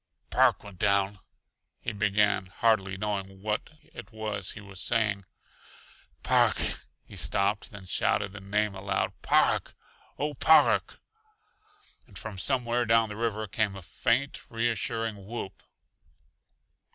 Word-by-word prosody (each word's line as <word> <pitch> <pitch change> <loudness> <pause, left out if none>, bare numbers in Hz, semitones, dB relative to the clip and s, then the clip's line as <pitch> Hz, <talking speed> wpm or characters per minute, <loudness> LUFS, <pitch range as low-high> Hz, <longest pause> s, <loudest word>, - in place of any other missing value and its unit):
"Park - - +4
went 100 -3 -12
down," 100 0 +2 0.6
he - - -3
began, 105 -2 +2
hardly 100 -1 +1
knowing 95 -1 -4
what 105 0 -1
it 150 -9 -12
was 105 -3 -3
he - - -9
was 100 -2 -9
saying. 105 -4 +1 1.0
"Park - - +4 0.3
" - - -39
He - - -13
stopped, 100 +1 0
then 100 -2 -11
shouted 95 +2 0
the 100 - -7
name 105 +2 0
aloud. 95 0 -1
"Park! - - +2 0.4
Oh 150 +2 -1
h, 145 - -14
Park!" 160 - +5 1.1
And - - -12
from 105 -4 -6
somewhere 120 0 +2
down 115 -1 +4
the 105 - -6
river 110 -1 -1
came 105 0 -1
a 95 - -9
faint 120 - -1
reassuring 115 -3 -2
whoop. 105 -4 -6
105 Hz, 130 wpm, -28 LUFS, 100-115 Hz, 1.1 s, Park